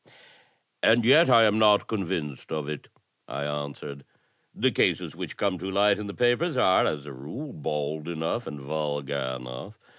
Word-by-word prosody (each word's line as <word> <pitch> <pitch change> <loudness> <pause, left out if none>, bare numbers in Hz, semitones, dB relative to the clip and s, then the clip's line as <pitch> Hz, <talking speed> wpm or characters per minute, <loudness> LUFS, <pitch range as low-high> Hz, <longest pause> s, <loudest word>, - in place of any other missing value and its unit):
"And 115 0 +4
yet 145 +5 +6
I 115 -2 +7
am 110 0 +3
not 105 -2 +5
convinced 85 -9 -4
of 75 -2 -3
it," 75 -1 -6 0.4
I 70 - -4
answered. 70 -1 -5 0.5
"The - - +2
cases - - +1
which - - -6
come 95 -3 0
to 95 +3 -4
light 100 +1 +3
in 105 - -5
the 100 - -7
papers 130 +6 +2
are, 95 -7 +4
as 75 -2 -3
a 70 - -8
rule, 80 - -7
bald 75 +1 -3
enough, 85 +8 -2
and 75 -2 -6
vulgar 70 -2 -3
enough. 60 0 -9
80 Hz, 170 wpm, -26 LUFS, 70-105 Hz, 0.5 s, I